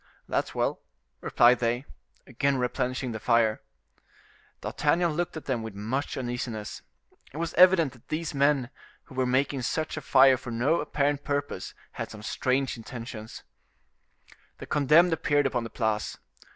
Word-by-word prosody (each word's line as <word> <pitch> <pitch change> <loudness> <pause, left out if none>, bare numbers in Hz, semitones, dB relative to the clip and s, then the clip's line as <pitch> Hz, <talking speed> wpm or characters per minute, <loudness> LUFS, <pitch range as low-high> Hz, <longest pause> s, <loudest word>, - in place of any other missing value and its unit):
"That's - - -2
well," - - 0 0.4
replied 120 +1 +4
they, 120 +3 0 0.4
again 135 +2 0
replenishing 125 0 -1
the 110 - -5
fire. 115 -1 +2 1.0
D'Artagnan 170 0 +1
looked 170 0 -2
at 160 - -8
them 130 -4 -1
with 110 -2 -7
much 120 +8 -3
uneasiness; 120 -4 -4 0.5
it 145 - -10
was 165 +1 -3
evident 175 -5 +6
that 120 - -20
these 155 0 -3
men 140 -2 +2 0.3
who - - -16
were 130 -1 0
making 135 +1 +1
such 155 +6 -2
a - - -3
fire 135 -2 +6
for 130 -1 -9
no 130 +8 +1
apparent 145 0 0
purpose 145 -9 -3 0.2
had - - -5
some 105 -1 -10
strange 130 +3 0
intentions. 115 -1 -8 1.1
The - - -8
condemned 155 +4 +4
appeared 145 -2 +1
upon 125 -3 0
the - - -6
Place. 110 -2 -2
130 Hz, 150 wpm, -27 LUFS, 120-145 Hz, 1.1 s, evident